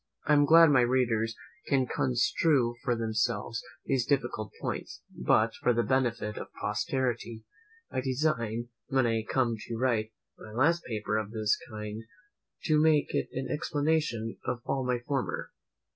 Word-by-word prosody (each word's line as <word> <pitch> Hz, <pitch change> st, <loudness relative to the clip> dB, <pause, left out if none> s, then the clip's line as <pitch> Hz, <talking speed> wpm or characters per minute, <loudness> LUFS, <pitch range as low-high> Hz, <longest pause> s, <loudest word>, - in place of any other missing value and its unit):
I 150 Hz, -, +3 dB
am 145 Hz, -1 st, +5 dB
glad 165 Hz, +1 st, +7 dB
my 130 Hz, -3 st, +5 dB
readers 120 Hz, -3 st, +1 dB, 0.3 s
can 135 Hz, -2 st, +2 dB
construe 125 Hz, +1 st, +2 dB
for 120 Hz, -, +1 dB
themselves 115 Hz, +1 st, -1 dB, 0.2 s
these 135 Hz, -3 st, +1 dB
difficult 120 Hz, -6 st, -1 dB
points; -, -, -5 dB
but, -, -, +2 dB
for 125 Hz, -, +3 dB
the 120 Hz, -, +2 dB
benefit 120 Hz, -5 st, 0 dB
of -, -, -6 dB
posterity, 120 Hz, -4 st, -2 dB, 0.5 s
I -, -, -1 dB
design, 120 Hz, -4 st, -1 dB, 0.2 s
when 135 Hz, -2 st, +2 dB
I 115 Hz, -1 st, +1 dB
come 120 Hz, 0 st, 0 dB
to 115 Hz, -, -4 dB
write 115 Hz, -3 st, 0 dB, 0.3 s
my 105 Hz, -, -11 dB
last 165 Hz, +8 st, +2 dB
paper 110 Hz, -2 st, -2 dB
of 110 Hz, -2 st, -2 dB
this 110 Hz, -1 st, +1 dB
kind, 105 Hz, 0 st, -6 dB, 0.6 s
to 155 Hz, -2 st, +3 dB
make 155 Hz, -2 st, +3 dB
it -, -, 0 dB
an 130 Hz, +1 st, -3 dB
explanation 145 Hz, -7 st, -1 dB
of 125 Hz, -1 st, -3 dB
all 135 Hz, -1 st, -1 dB
my 125 Hz, -1 st, +1 dB
former. 135 Hz, -3 st, -2 dB
120 Hz, 150 wpm, -29 LUFS, 115-135 Hz, 0.6 s, glad